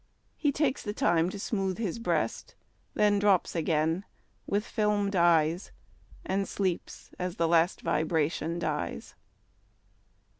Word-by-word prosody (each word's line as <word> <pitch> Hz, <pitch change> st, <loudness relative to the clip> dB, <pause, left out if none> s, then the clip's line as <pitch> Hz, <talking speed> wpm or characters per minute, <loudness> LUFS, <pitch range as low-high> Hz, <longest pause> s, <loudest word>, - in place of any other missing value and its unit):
He 290 Hz, -, +1 dB
takes 280 Hz, -1 st, 0 dB
the 205 Hz, -, -4 dB
time 170 Hz, 0 st, +2 dB
to 205 Hz, -, -6 dB
smooth 195 Hz, -3 st, -1 dB
his 220 Hz, -2 st, -3 dB
breast. 230 Hz, -, -2 dB, 0.4 s
Then 205 Hz, -1 st, +3 dB
drops 200 Hz, -3 st, +3 dB
again 160 Hz, +2 st, +1 dB, 0.4 s
with 205 Hz, +2 st, 0 dB
fdmed 210 Hz, -2 st, 0 dB
eyes, 170 Hz, 0 st, +3 dB, 0.5 s
And 195 Hz, +1 st, -1 dB
sleeps 185 Hz, -4 st, -3 dB
as 180 Hz, -1 st, -3 dB
the 165 Hz, -, +1 dB
last 170 Hz, +1 st, +3 dB
vibration 160 Hz, +1 st, 0 dB
dies. 150 Hz, -, -3 dB
180 Hz, 120 wpm, -29 LUFS, 165-205 Hz, 0.5 s, Then